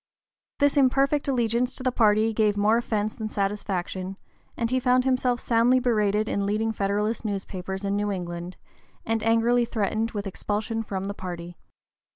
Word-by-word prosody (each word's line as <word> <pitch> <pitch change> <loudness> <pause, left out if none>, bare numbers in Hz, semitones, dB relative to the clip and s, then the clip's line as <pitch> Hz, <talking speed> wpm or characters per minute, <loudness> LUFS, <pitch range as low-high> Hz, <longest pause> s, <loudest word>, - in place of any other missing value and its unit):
This 285 0 +2
imperfect 275 +2 +3
allegiance 240 -1 +1
to 260 - -6
the 255 - +2
party 220 -1 +3
gave 210 -2 +2
more 210 +2 +4
offence 215 -3 -1
than 220 -1 -5
satisfaction, 195 -2 -3 0.4
and 230 0 -1
he 255 - +2
found 250 0 +3
himself 255 -2 +1
soundly 240 +3 +3
berated 215 -3 +1
in 200 0 -1
leading 220 +2 0
Federalist 210 +2 -1
newspapers 190 -2 -4
in 200 0 0
New 205 0 0
England, 175 -1 -5 0.5
and 225 0 0
angrily 230 +2 +3
threatened 220 0 -1
with 205 -3 -5
expulsion 215 +3 -2
from 195 -3 -4
the 200 +1 -3
party. 175 -2 -7
215 Hz, 160 wpm, -26 LUFS, 200-240 Hz, 0.5 s, more